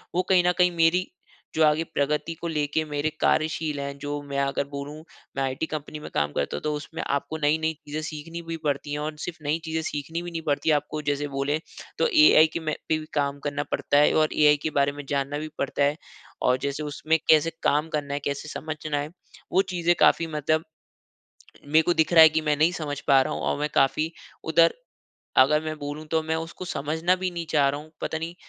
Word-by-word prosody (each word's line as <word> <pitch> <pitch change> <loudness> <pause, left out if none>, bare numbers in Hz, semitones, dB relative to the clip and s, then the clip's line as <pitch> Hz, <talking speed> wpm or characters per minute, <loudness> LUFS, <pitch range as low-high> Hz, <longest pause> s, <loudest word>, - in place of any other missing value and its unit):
वो 180 - +3
कहीं 185 -2 +5
न - - +5
कहीं 180 -1 +4
मेरी 170 +2 +3 0.5
जो 160 - +4
आगे 155 +1 +3
प्रगति 150 0 -1
को 170 - -6
लेके 150 -1 0
मेरे 150 0 -1
कार्यशील 155 -1 +1
हैं 140 0 -5
जो 145 +1 -4
मैं 140 0 -1
अगर 140 0 0
बोलूँ 140 +1 -6 0.4
मैं 135 - +1
आईटी 135 +4 -2
कंपनी 150 0 -5
में 150 - -8
काम 75 0 0
करता 70 - -2
हूँ - - -6
तो 150 0 0
उसमें 150 +2 -6
आपको 140 +3 -2
नई-नई 160 +1 +1
चीज़ें 150 0 -6
सीखनी 155 +2 -6
भी 165 0 -3
पड़ती 145 0 -1
है। 145 - -2
और 150 +1 -4
सिर्फ़ 175 - -6
नई 150 +3 0
चीज़ें 160 0 -2
सीखनी 160 +2 -4
भी 175 0 -7
नहीं 165 -1 -4
पड़ती 145 +2 +1
है 155 - +5
आपको 150 +1 -3
जैसे 145 +1 -2
बोले 140 +2 0 0.4
तो - - +3 0.2
एआई 160 - +7
के - - -2
में 155 -2 -2 0.2
पे 160 - +3
भी 155 - -8
काम 140 -1 -1
करना 145 0 -2
पड़ता 145 - +1
है। 150 - +5
और 155 -1 +2
एआई 150 -1 +5
के - - 0
बारे 140 0 +3
में 145 0 -9
जानना 140 0 -1
भी 155 - -5
पड़ता 140 +1 0
है। 145 +1 +2 0.5
और 125 0 +3
जैसे 140 +2 -3
उसमें 155 +2 0
कैसे 155 +1 +6
काम 150 +2 +2
करना 145 -2 -3
है, 145 - -1
कैसे 140 +1 -4
समझना 155 -1 -4
है, 145 +1 -3 0.4
वो 190 - +4
चीज़ें 175 -1 +2
काफ़ी 165 - +4
मतलब 155 0 0 1.0
मेरे 155 +2 +4
को 175 +2 +1
दिख 160 0 +2
रहा 165 -2 +9
है 160 - +10
कि 160 +1 0
मैं 150 -1 +1
नहीं 160 +4 +3
समझ 145 -5 -4
पा 135 -1 +7
रहा - - -3
हूँ। - - -4
और - - 0
मैं 150 - 0
काफ़ी 155 +4 +2 0.3
उधर 165 +1 +4 0.6
अगर 150 +4 +5
मैं 155 0 -3
बोलू 145 +2 -5
तो 160 -1 +2
मैं 160 0 -1
उसको 165 +3 -6
समझना 160 +3 0
भी 185 0 -2
नहीं 170 -1 -5
चाह 145 -3 +3
रहा 145 +1 -3
हूँ। 155 +1 -16
पता 160 - -2
नहीं 165 +2 -5
150 Hz, 230 wpm, -25 LUFS, 145-160 Hz, 1.0 s, है